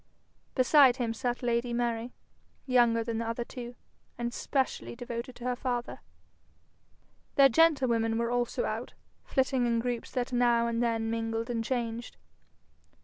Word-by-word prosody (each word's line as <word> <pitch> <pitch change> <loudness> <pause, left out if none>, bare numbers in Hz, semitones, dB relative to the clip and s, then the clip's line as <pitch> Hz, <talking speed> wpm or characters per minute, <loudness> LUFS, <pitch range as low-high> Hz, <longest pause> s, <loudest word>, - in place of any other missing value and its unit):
Beside 260 -1 +6
him 240 -3 -2
sat 245 +2 -3
lady 240 0 0
Mary, 235 0 -1 0.5
younger 240 -3 +3
than 225 -1 -3
the 230 - -3
other 230 +1 -2
two, 240 0 -8 0.4
and 240 0 -3
specially 265 -2 -2
devoted 240 0 -6
to 240 - -11
her 250 0 0
father. 245 -1 -3 1.4
Their 275 -1 +7
gentlewomen 245 -7 +3
were 235 0 0
also 245 0 0
out, - - -4 0.3
flitting 260 -2 +1
in 235 -1 +1
groups 240 0 -2
that 250 -1 -3
now 240 -1 +3
and 235 0 -1
then 225 -1 0
mingled 225 +1 -2
and 230 -1 -1
changed. 235 -1 -3
240 Hz, 145 wpm, -29 LUFS, 230-250 Hz, 1.4 s, Their